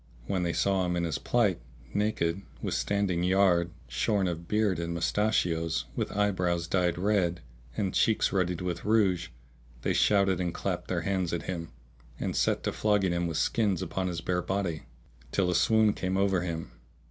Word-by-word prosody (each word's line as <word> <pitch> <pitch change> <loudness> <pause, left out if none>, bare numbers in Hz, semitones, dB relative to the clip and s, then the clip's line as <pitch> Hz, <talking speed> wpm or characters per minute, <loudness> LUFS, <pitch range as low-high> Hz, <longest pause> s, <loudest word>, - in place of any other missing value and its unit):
When 95 +4 -1
they 85 -1 0
saw 95 +3 +1
him 90 -1 0
in 85 - 0
his 80 -4 -2
plight, 105 -8 +1 0.3
naked, 100 -4 0 0.2
with - - -3
standing 100 -4 0
yard, 90 -2 +3 0.2
shorn 95 - +1
of 85 -1 -4
beard 105 -4 +1
and 85 0 -3
mustachios, 85 - 0
with - - -2
eyebrows 90 -4 0
dyed 90 -2 +1
red, 90 -3 +1 0.4
and 95 -2 -1
cheeks 110 - +2
ruddied 90 -3 0
with 90 -2 -3
rouge, 100 -5 +2 0.6
they - - +1
shouted 100 -3 +3
and 85 -1 -2
clapped - - -3
their - - -1
hands 95 -3 -1
at 85 -3 -2
him, 85 -3 -4 0.5
and - - -2
set - - +1
to - - 0
flogging 105 -3 +1
him 85 0 0
with 80 -2 -2
skins 100 -5 +1
upon 95 +1 -2
his 85 -2 -3
bare 90 +1 0
body 95 -4 -2 0.5
till 90 -2 +1
a - - 0
swoon 110 -2 +4
came 95 +1 -2
over 95 -2 +2
him. 85 -2 -4
90 Hz, 175 wpm, -29 LUFS, 85-100 Hz, 0.6 s, swoon